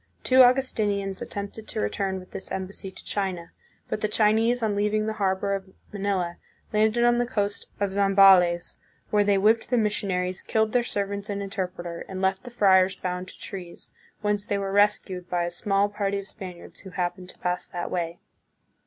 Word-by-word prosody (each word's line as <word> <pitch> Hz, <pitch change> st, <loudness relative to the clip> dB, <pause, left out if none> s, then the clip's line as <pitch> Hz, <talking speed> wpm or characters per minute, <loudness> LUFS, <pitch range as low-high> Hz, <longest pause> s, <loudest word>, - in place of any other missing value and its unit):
Two 260 Hz, 0 st, +6 dB
Augustinians 215 Hz, -7 st, +2 dB
at -, -, -6 dB
tempted 205 Hz, +2 st, -6 dB
to -, -, -2 dB
return 190 Hz, -, -1 dB
with 185 Hz, -, -14 dB
this -, -, -8 dB
embassy 190 Hz, +1 st, -4 dB
to -, -, -12 dB
China, 185 Hz, -4 st, -2 dB, 0.4 s
but 215 Hz, -, -3 dB
the 215 Hz, -, +2 dB
Chinese 225 Hz, +3 st, +2 dB
on 210 Hz, -2 st, +1 dB
leaving 210 Hz, +1 st, +1 dB
the 220 Hz, -, -1 dB
harbor 195 Hz, +1 st, +1 dB
of 195 Hz, -1 st, -4 dB, 0.2 s
Manila 195 Hz, -4 st, -1 dB, 0.4 s
landed 220 Hz, +2 st, +3 dB
on 240 Hz, 0 st, +4 dB
the 245 Hz, -, +2 dB
coast 205 Hz, -3 st, -2 dB
of 200 Hz, -1 st, 0 dB
Zambales, 195 Hz, -3 st, +5 dB, 0.3 s
where 210 Hz, -1 st, +4 dB
they 200 Hz, -1 st, +3 dB
whipped 220 Hz, +3 st, +3 dB
the 245 Hz, -, +2 dB
missionaries, 185 Hz, -4 st, 0 dB
killed 220 Hz, -1 st, +1 dB
their 245 Hz, -, +3 dB
servants 200 Hz, -2 st, -3 dB
and 200 Hz, 0 st, -2 dB
interpreter, 180 Hz, -4 st, -4 dB
and 190 Hz, -1 st, -5 dB
left 190 Hz, +3 st, 0 dB
the -, -, -6 dB
friars 190 Hz, -5 st, +4 dB
bound 180 Hz, 0 st, -4 dB
to -, -, -10 dB
trees, 180 Hz, -3 st, -8 dB, 0.3 s
whence 210 Hz, -1 st, 0 dB
they 205 Hz, -, -1 dB
were 195 Hz, -1 st, -2 dB
rescued 195 Hz, -3 st, +1 dB
by 175 Hz, -1 st, 0 dB
a 170 Hz, -, -2 dB
small 195 Hz, +3 st, +1 dB
party 200 Hz, -1 st, -2 dB
of 200 Hz, 0 st, -6 dB
Spaniards 185 Hz, -5 st, -9 dB
who 190 Hz, -, -10 dB
happened 180 Hz, 0 st, -3 dB
to -, -, -6 dB
pass 180 Hz, 0 st, -2 dB
that 175 Hz, -1 st, -5 dB
way. 170 Hz, -1 st, -2 dB
200 Hz, 190 wpm, -26 LUFS, 185-210 Hz, 0.4 s, Two